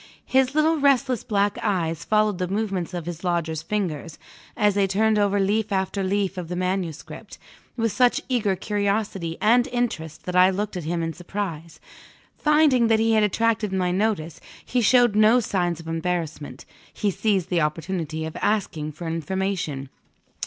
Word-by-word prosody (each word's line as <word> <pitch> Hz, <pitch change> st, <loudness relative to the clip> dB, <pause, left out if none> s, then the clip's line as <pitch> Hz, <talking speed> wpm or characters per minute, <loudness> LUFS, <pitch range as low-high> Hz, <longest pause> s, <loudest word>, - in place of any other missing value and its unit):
His 265 Hz, +1 st, +2 dB
little 315 Hz, +1 st, +3 dB
restless 260 Hz, -4 st, +2 dB
black 205 Hz, 0 st, 0 dB
eyes 170 Hz, -6 st, -1 dB
followed 215 Hz, -3 st, +1 dB
the 180 Hz, -, -1 dB
movements 195 Hz, -3 st, -2 dB
of 170 Hz, -3 st, -4 dB
his 175 Hz, 0 st, -6 dB
lodger's 170 Hz, -3 st, -1 dB
fingers, 165 Hz, -4 st, -3 dB, 0.4 s
as 210 Hz, -1 st, +3 dB
they 200 Hz, 0 st, +2 dB
turned 215 Hz, +2 st, +2 dB
over 205 Hz, 0 st, +2 dB
leaf 205 Hz, +2 st, 0 dB
after 190 Hz, +1 st, -1 dB
leaf 195 Hz, 0 st, -1 dB
of 175 Hz, -, -6 dB
the 180 Hz, -, -4 dB
manuscript, 180 Hz, -3 st, -4 dB, 0.4 s
with 230 Hz, -1 st, +1 dB
such 245 Hz, +4 st, +3 dB
eager 225 Hz, -7 st, +1 dB
curiosity 200 Hz, -3 st, -2 dB
and 240 Hz, +4 st, +4 dB
interest 235 Hz, -, -3 dB
that 180 Hz, -, -4 dB
I 180 Hz, +1 st, +6 dB
looked 205 Hz, +2 st, -3 dB
at 175 Hz, -4 st, -5 dB
him 170 Hz, +1 st, -1 dB
in 165 Hz, 0 st, -3 dB
surprise. 170 Hz, -3 st, -6 dB, 0.6 s
Finding 300 Hz, -6 st, +3 dB
that 225 Hz, -1 st, +4 dB
he 225 Hz, +1 st, +2 dB
had 220 Hz, -1 st, +4 dB
attracted 215 Hz, 0 st, +1 dB
my 185 Hz, -2 st, 0 dB
notice, 185 Hz, -4 st, -1 dB, 0.2 s
he 250 Hz, -, 0 dB
showed 240 Hz, -1 st, +4 dB
no 215 Hz, +3 st, +5 dB
signs 175 Hz, -6 st, -1 dB
of 165 Hz, -, -11 dB
embarrassment 165 Hz, -5 st, -3 dB, 0.3 s
he 205 Hz, -, -1 dB
seized 190 Hz, -2 st, 0 dB
the 175 Hz, -2 st, +2 dB
opportunity 160 Hz, 0 st, -2 dB
of 160 Hz, -, -7 dB
asking 170 Hz, -8 st, -1 dB
for 170 Hz, +4 st, -8 dB
information. 165 Hz, -4 st, -3 dB
195 Hz, 165 wpm, -24 LUFS, 170-215 Hz, 0.6 s, I